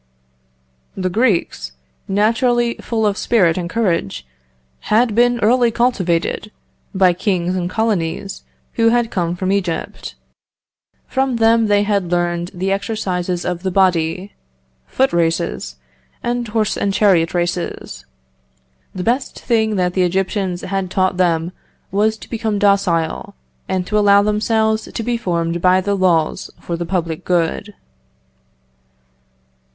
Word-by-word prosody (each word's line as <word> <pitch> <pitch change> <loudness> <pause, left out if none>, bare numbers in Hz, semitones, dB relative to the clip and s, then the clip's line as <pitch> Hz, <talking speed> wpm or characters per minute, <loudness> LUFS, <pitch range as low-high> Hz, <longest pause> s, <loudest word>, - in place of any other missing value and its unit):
"The 185 -1 -1
Greeks, 215 - 0 0.3
naturally 235 +4 +2
full 225 -2 -1
of 205 -1 0
spirit 180 -9 +3
and 175 -2 -3
courage, 170 - -1 0.6
had 225 +1 +3
been 240 +2 +3
early 240 +2 +4
cultivated 210 -5 0 0.4
by 185 -2 +4
kings 180 -1 -1
and 180 -1 -2
colonies 195 -3 -2 0.3
who 230 0 +3
had 235 0 +1
come 175 -2 -1
from 185 +1 -2
Egypt. 185 -4 -3 0.9
From 265 -1 0
them 225 0 +3
they 205 0 +3
had 200 -4 -1
learned 175 0 0
the 190 +1 -2
exercises 185 -4 -2
of 180 -1 -2
the 190 - -1
body, 185 0 +1 0.5
foot 265 +1 +1
races, 165 - -1 0.5
and 240 0 -1
horse 215 -1 0
and 200 - 0
chariot 180 -5 +3
races.... 175 0 -3 0.9
The 185 - -3
best 250 +5 -1
thing 220 -3 +1
that 180 -2 0
the 185 - +1
Egyptians 190 0 -1
had 195 -1 -3
taught 185 0 0
them 170 -2 +1 0.4
was 215 +3 +1
to - - -12
become 220 -3 -2
docile, 195 -5 +1 0.3
and 185 -1 -1
to 210 +3 +1
allow 200 -1 +5
themselves 220 +1 0
to 230 - -4
be 240 +1 -1
formed 170 -5 -2
by 185 +1 +4
the 200 +2 -1
laws 175 -5 +1
for 170 - -4
the 170 0 -4
public 170 -4 -2
good." 180 +4 -1
195 Hz, 130 wpm, -18 LUFS, 175-220 Hz, 0.9 s, allow